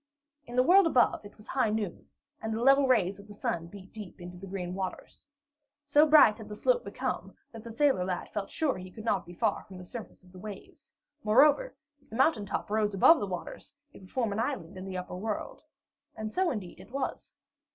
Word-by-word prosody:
In 240 - -7
the 250 - +5
world 370 +5 +6
above, 250 -8 +3
it 205 - -13
was 210 - -15
high 255 -2 +1
noon, 210 -4 -3 0.3
and 220 - -3
the 225 +2 -1
level 275 +1 +6
rays 200 -6 +2
of 200 - -13
the 205 - -11
sun 170 -4 -2
beat 190 +1 -13
deep 210 -4 -9
into 175 0 -9
the 190 +2 -9
green 180 -2 -4
waters. 190 +7 -6 0.6
So 295 +2 +5
bright 290 -9 +7
had 215 -1 -9
the 210 - -6
slope - - +2
become, - - -4 0.2
that 225 -2 -10
the 230 - -8
sailor 265 -4 +2
lad 180 -1 -3
felt 200 -2 -3
sure 310 -4 0
that - - -8
he 185 0 -8
could 215 +4 -10
not 195 -6 0
be 175 - -10
far 215 +2 0
from 190 - -11
the 180 - -9
surface 220 0 -9
of 180 - -19
the 185 - -12
waves. 205 0 -10 0.3
Moreover, 290 - +4 0.3
if - - -29
the 220 - -8
mountain 245 -5 +3
top 205 - -3
rose 210 -2 +1
above 320 - +7
the 205 - -2
waters, 180 +7 -6 0.2
it - - -13
would 185 - -14
form 235 -5 0
an 210 - -2
island 185 -4 -3
in 185 0 -7
the 190 -1 -5
upper 180 0 -5
world. 210 +3 -4 0.5
And 215 0 -5
so, 370 -1 +2
indeed, 200 -7 -5
it - - -13
was. 275 +3 -4
210 Hz, 230 wpm, -30 LUFS, 185-255 Hz, 0.6 s, bright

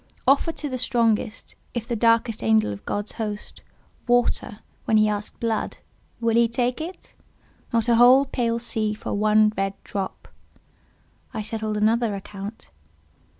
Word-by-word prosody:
Offer 280 +5 +4
to 300 - -4
the 255 -2 -4
strongest—if 230 0 -1
the 235 - -1
darkest 230 0 +2
angel 110 -2 +3
of 100 - -11
God's 205 +1 -2
host—water, 220 +1 -3 0.2
when 220 - +3
he 215 - +5
has 210 0 +1
asked - - -16
blood—will 230 0 -3
he 235 0 +5
take 245 +3 -1
it? 350 +4 -8 0.6
Not 230 -1 +1
a 235 -1 +4
whole 255 +3 +7
pale 235 -3 -1
sea 220 -2 -1
for 210 - -5
one 215 +1 +4
red 195 0 -1
drop. 195 -2 -5 1.1
I 215 - -2
settled 215 0 -3
another 220 0 +2
account. 200 - -8
225 Hz, 140 wpm, -24 LUFS, 210-240 Hz, 1.1 s, whole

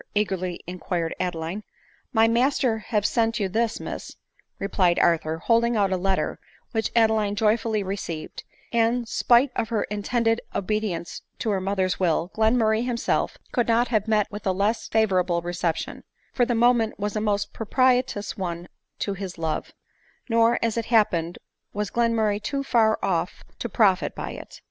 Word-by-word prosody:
eagerly 185 -4 -1
inquired 175 -1 -3
Adeline. 175 +2 -3 0.3
" - - -33
My 225 -3 +4
master 245 0 +2
have 210 -1 -1
sent 225 0 +1
you 200 - +1
this, 225 +4 -1
Miss," - - -7 0.4
replied 185 -3 +1
Arthur, 160 -1 +2
holding 230 +6 +2
out 200 -2 +2
a - - +2
letter, 190 +1 -1 0.3
which 225 -2 0
Adeline 220 -3 +3
joyfully 215 0 +1
received; 185 -5 -5 0.3
and, 235 +1 +2
spite 240 +3 +3
of 225 - -1
her 225 -3 0
intended 225 +2 0
obedience 200 -4 -2 0.2
to 220 - -1
her 195 -2 0
mother's 190 -1 0
will, 175 0 +1
Glenmurray 220 0 +2
himself 245 -2 -1
could 240 - +1
not 235 +1 +2
have 215 -2 +1
met 215 -2 +3
with 205 -1 -6
a - - +3
less 205 +4 0
fa 220 0 +3
vorable 180 -3 0
reception, 175 -1 -3 0.3
for 245 - +3
the 240 - +1
moment 235 -1 +3
was 205 +1 -2
a 215 - 0
most 205 -1 -1
propitious 250 -2 +1
one 175 -3 -4 0.3
to 200 - -2
his 190 -2 -6
love; 160 -1 -3 0.6
nor, 230 0 +3
as 230 0 -1
it 230 - -1
happened, 180 -8 +2 0.4
was 210 -1 -3
Glenmurray 225 -3 +1
too 275 +3 -2
far 225 -5 +3
off 180 -2 -1 0.2
to 235 - -3
profit 195 -3 +2
by - - -5
it. - - -10
215 Hz, 165 wpm, -25 LUFS, 185-230 Hz, 0.6 s, My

